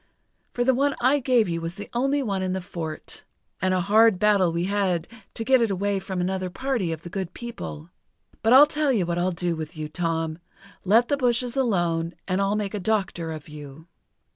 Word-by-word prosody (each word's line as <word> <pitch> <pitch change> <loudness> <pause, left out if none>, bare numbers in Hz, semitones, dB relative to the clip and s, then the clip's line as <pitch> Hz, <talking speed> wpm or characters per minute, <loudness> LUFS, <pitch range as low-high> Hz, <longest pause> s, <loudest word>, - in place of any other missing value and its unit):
For 245 - +1
the 260 +1 +3
one 280 +2 +1
I 265 +4 +3
gave 250 -5 +3
you 165 -1 -2
was 165 +2 -4
the 205 - -7
only 275 +4 +1
one 200 -5 -2
in 185 -1 -1
the 190 - -1
fort. 170 -4 -6 0.4
And 185 +1 +1
a 185 -1 +2
hard 215 +2 +5
battle 200 -3 +3
we 170 +1 -1
had 185 -3 0 0.3
to 225 - -3
get 260 +1 +4
it 230 - +2
away 200 +1 0
from 190 -1 -4
another 185 +1 -1
party 235 -3 -2
of 160 0 -5
the 175 - -7
Good 190 -3 -4
People! 205 -9 -7 0.5
But 225 - +2
I'll 270 +3 +10
tell 300 -1 0
you 205 -8 +1
what 170 0 -1
I'll 180 +1 +1
do 175 -1 -1
with 155 0 -7
you, 155 -1 -4
Tom; 165 0 -2 0.4
let 225 +6 +4
the 285 - +1
bushes 245 -1 +1
alone, 175 -9 0
and 185 +1 0
I'll 200 +1 +1
make 210 -1 -2
a 210 - -2
doctor 190 -5 -1
of 155 -2 -8
you." 150 0 -11
190 Hz, 215 wpm, -25 LUFS, 170-235 Hz, 0.5 s, I'll